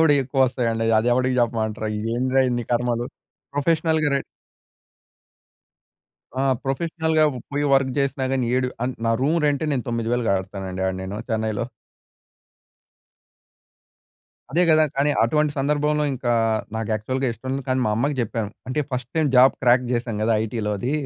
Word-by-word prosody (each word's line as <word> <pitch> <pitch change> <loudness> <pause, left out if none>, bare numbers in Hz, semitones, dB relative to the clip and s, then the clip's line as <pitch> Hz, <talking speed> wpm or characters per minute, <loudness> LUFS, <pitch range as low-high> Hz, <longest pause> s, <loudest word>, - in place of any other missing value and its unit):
కూడా 160 -2 +5
ఎక్కువ 135 +1 -2
వస్తాయండి. 115 -3 -1
అది 115 - +1
ఎవడికి 130 +1 +1
చెప్పమంటారు? 110 -2 -1
ఇది 110 - -3
ఏందిరా 130 +2 +2
ఇన్ని 120 -1 -1
కర్మలు? 120 0 0 0.5
ప్రొఫెషనల్‌గా 160 +1 +1
ర - - +3 2.2
ఆ! - - +1 0.2
ప్రొఫెషనల్‌గా 160 +3 +1 0.3
పోయి 145 +1 0
వర్క్ 135 -1 +2
చేసినా 140 -1 0
కాని, 130 -3 0
ఏడు 130 0 +1 0.2
అంటే 130 - -3
నా 115 - +3
రూమ్ 155 +5 +2
రెంటే 145 +1 +1
నేను 130 -3 -2
9000 115 +1 -1
కడతానండి 95 -1 -3
ఆడ 95 - 0
నేను 95 +2 -5
చెన్నైలో. 110 0 -1 2.9
అదే 175 +4 +3
కదా! 155 -1 +5
కానీ 145 +2 +2
అటువంటి 150 +5 +2
సందర్భంలో 150 +2 +1
ఇంకా 125 -1 -2 0.5
నాకు 110 -1 -3
యాక్చువల్‌‌గా 130 +5 -1
ఇష్టం 130 +3 -7
లేదు 135 - -3
కానీ 130 0 +1
మా - - +1
అమ్మకి 140 +5 0
చెప్పాము. 115 -2 -2 0.2
అంటే 130 +4 -1
ఫస్ట్ 125 -1 -4
టైమ్ 160 -2 +2
జాబ్ 130 +2 +7
క్రాక్ 125 0 +4
చేశాను 120 -3 -2
కదా 115 - +2
ఐటీ‌లోది. 110 +2 -2
125 Hz, 145 wpm, -23 LUFS, 115-140 Hz, 2.9 s, జాబ్